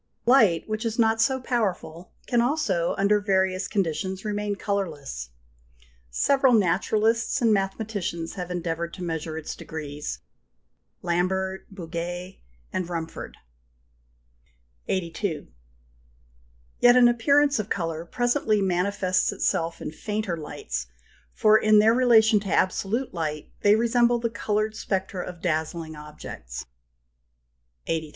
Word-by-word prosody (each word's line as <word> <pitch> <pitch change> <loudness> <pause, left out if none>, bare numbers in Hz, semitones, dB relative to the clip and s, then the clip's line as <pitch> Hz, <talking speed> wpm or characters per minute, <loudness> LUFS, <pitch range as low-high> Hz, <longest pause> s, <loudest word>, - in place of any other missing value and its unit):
Light, 220 -10 +4
which 215 +1 -3
is 230 -1 -2
not 225 -1 +3
so 260 +3 +2
powerful, 185 -9 -2
can 240 -1 +2
also, 235 - 0
under 200 +1 +3
various 190 -2 +1
conditions, 190 +1 -2
remain 205 -1 -2
colourless. 155 - -3 0.8
Several 265 - +3
naturalists 220 +5 +2
and 230 -4 +3
mathematicians 195 -4 -2
have 180 -2 -5
endeavoured 170 -1 -3
to 185 - -7
measure 160 -2 -3
its 160 - -5
degrees 150 -2 -6 0.9
Lambert, 190 +2 -1
Bouguer, 175 0 -6 0.4
Rumford. 170 -2 -4 1.5
82. 170 - -2 1.3
Yet 245 0 +7
an 245 -1 +7
appearance 280 +3 +3
of 215 0 -3
colour 165 -3 -2
presently 240 +2 +1
manifests 185 0 +1
itself 165 0 -1
in - - -4
fainter 210 +2 -3
lights, 65 - -5 0.4
for 215 - +4
in 215 0 +5
their 215 +2 +6
relation 230 -3 +5
to 200 -1 -5
absolute 205 +8 0
light 155 -3 -4
they 205 +1 +5
resemble 235 +1 +3
the 230 -1 -2
coloured 215 0 -1
spectra 190 -3 -2
of 175 -1 -9
dazzling 160 -1 -2
objects 150 - -8 1.2
(39). 165 - 0
83. 155 -1 -7
190 Hz, 115 wpm, -25 LUFS, 170-220 Hz, 1.5 s, Yet